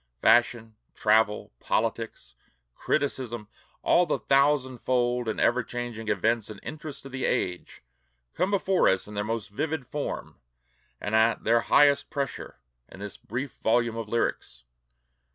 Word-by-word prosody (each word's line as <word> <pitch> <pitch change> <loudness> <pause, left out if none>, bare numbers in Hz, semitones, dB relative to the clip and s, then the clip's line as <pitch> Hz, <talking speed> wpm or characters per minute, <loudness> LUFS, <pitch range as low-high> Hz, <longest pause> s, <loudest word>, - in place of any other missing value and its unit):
Fashion, 120 - +3 0.2
travel, 105 0 +2
politics, 110 - -2 0.4
criticism, 120 - -2 0.4
all 175 0 +4
the - - +1
thousandfold 130 -3 +1
and 110 - -2
ever 125 +2 +3
changing 120 -2 -6
events 110 -1 +1
and 105 -2 -8
interests 150 -3 -7
of 135 - -9
the 130 0 -4
age, 90 -7 -2 0.5
come 185 +3 0
before 195 -2 +3
us 95 +1 0
in 105 - -9
their 105 0 -1
most 110 0 -3
vivid 155 +5 -2
form 145 +3 -5 0.6
and 105 - -4
at 110 +1 +3
their 115 +1 +3
highest 140 +4 +4
pressure, 140 -3 -4 0.3
in - - -13
this 100 -1 -6
brief 130 +5 -5
volume 115 0 +1
of 115 -2 -5
lyrics. 65 - -2
120 Hz, 135 wpm, -27 LUFS, 110-135 Hz, 0.6 s, all